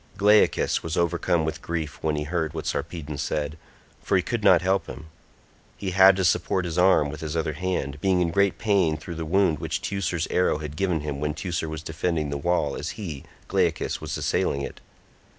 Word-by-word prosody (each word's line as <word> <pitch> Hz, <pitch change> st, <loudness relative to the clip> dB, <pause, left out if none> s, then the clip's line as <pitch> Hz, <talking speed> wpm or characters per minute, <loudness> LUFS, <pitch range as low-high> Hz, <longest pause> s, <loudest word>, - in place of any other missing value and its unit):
Glaucus 105 Hz, +2 st, +4 dB
was 80 Hz, -1 st, -4 dB
overcome 85 Hz, -1 st, +1 dB
with 80 Hz, -, -4 dB
grief 80 Hz, -4 st, -4 dB
when 80 Hz, -1 st, 0 dB
he 75 Hz, -, -2 dB
heard 80 Hz, 0 st, -2 dB
what 80 Hz, -, -4 dB
Sarpedon 75 Hz, -1 st, -4 dB
said, 75 Hz, 0 st, -2 dB, 0.5 s
for 95 Hz, -, +2 dB
he 90 Hz, -, +1 dB
could 115 Hz, +1 st, -3 dB
not 95 Hz, -3 st, +6 dB
help 95 Hz, +1 st, +1 dB
him. 80 Hz, -, -9 dB, 0.7 s
He 95 Hz, -2 st, -3 dB
had 95 Hz, +1 st, +7 dB
to 95 Hz, -1 st, 0 dB
support 90 Hz, +1 st, +1 dB
his 85 Hz, -2 st, -3 dB
arm 90 Hz, -5 st, +4 dB
with 75 Hz, 0 st, -8 dB
his 80 Hz, +1 st, -3 dB
other 80 Hz, -1 st, -1 dB
hand, 75 Hz, -4 st, -3 dB
being 95 Hz, -2 st, +2 dB
in 85 Hz, -2 st, +1 dB
great 100 Hz, +2 st, +2 dB
pain 95 Hz, -8 st, +2 dB
through 85 Hz, +2 st, -8 dB
the 80 Hz, -1 st, -4 dB
wound 95 Hz, -3 st, +2 dB
which -, -, -2 dB
Teucer's 90 Hz, -4 st, -2 dB
arrow 90 Hz, -4 st, +2 dB
had 75 Hz, -1 st, -6 dB
given 90 Hz, -2 st, 0 dB
him 75 Hz, -2 st, -4 dB
when 75 Hz, +1 st, -2 dB
Teucer 85 Hz, -1 st, -3 dB
was 80 Hz, 0 st, -6 dB
defending 80 Hz, -2 st, -2 dB
the 70 Hz, -, -2 dB
wall 85 Hz, -2 st, 0 dB
as -, -, -5 dB
he, 80 Hz, -10 st, -6 dB, 0.2 s
Glaucus, -, -, 0 dB
was -, -, -4 dB
assailing 70 Hz, 0 st, 0 dB
it. -, -, -7 dB
85 Hz, 205 wpm, -25 LUFS, 75-95 Hz, 0.7 s, had